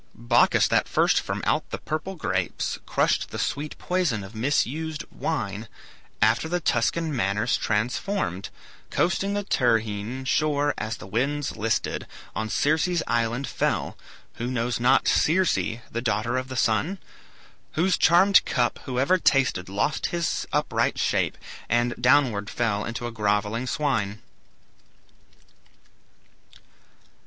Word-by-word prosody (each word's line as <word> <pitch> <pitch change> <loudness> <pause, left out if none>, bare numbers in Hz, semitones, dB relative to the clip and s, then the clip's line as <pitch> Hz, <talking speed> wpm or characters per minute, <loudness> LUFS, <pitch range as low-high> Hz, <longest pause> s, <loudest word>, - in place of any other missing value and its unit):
"Bacchus - - +3
that - - +2
first - - +3
from - - -4
out - - 0
the - - -4
purple 170 +5 -4
grapes 165 - -2
Crushed - - +1
the - - -6
sweet 145 +1 -3
poison 175 - -1
of 95 +3 -10
misused 150 +6 -1
wine, 110 -8 -3 0.6
After 115 +8 +2
the 175 +1 0
Tuscan 155 +3 0
manners 105 +1 +1
transformed, 110 - -1 0.4
Coasting 195 +3 0
the 205 - -1
Tyrrhene 115 - 0
shore 145 +1 +1
as 110 +1 -4
the - - -10
winds 135 +8 -1
listed 110 0 -1 0.3
On 110 +3 -2
Circe's 160 +7 +1
island 120 +3 0
fell - - -1 0.4
(who 120 - -3
knows 120 -1 -1
not 130 +3 +3
Circe, 180 +3 +3
The 115 +1 -3
daughter 115 +1 0
of 130 0 -2
the 130 - -6
Sun? 120 - +1 0.8
whose 180 +2 +2
charmed 185 +4 +5
cup 120 -2 0
Whoever 135 +8 +2
tasted 130 - +2
lost 105 +10 0
his 170 -1 -2
upright - - 0
shape, - - 0 0.3
And 120 +1 +2
downward 125 -6 +3
fell 105 -4 -1
into 115 +1 -4
a 120 - -3
grovelling 105 +2 0
swine)." 115 -9 -1
125 Hz, 125 wpm, -25 LUFS, 110-155 Hz, 0.8 s, charmed